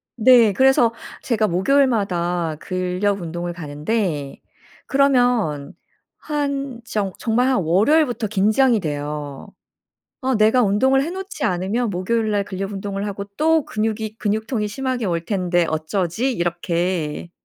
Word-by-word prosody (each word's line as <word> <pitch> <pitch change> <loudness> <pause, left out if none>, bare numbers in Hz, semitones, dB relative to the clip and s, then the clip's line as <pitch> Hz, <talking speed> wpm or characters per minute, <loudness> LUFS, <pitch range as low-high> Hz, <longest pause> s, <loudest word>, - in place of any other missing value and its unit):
네. 235 -2 +6
그래서 255 -1 +4 0.3
제가 220 -3 +1
목요일마다 180 - +1
근력 185 +2 -1
운동을 175 +1 -4
가는데 150 -1 -3 0.5
그러면 245 - +2 0.4
한 280 -4 -3
정 200 -4 -2
정말 245 +3 +1
한 260 -1 +2
월요일부터 230 - +2
긴장이 215 +4 +3
돼요. 145 -2 -5 0.7
'아 260 -1 0
내가 220 +4 +4
운동을 265 +7 +3
해 325 - -3
놓지 385 +3 -6
않으면 195 +6 0
목요일 215 +5 -1
날 205 -1 +1
근력 195 0 -5
운동을 200 0 -4
하고 200 0 -5
또 320 -1 +3
근육이 220 0 -3
근육통이 215 +1 -1
심하게 255 0 -3
올 170 -2 -1
텐데 180 -4 +1
어쩌지?' 175 +9 -1
이렇게. 170 -3 -2
210 Hz, 275 characters per minute, -21 LUFS, 175-245 Hz, 0.7 s, 네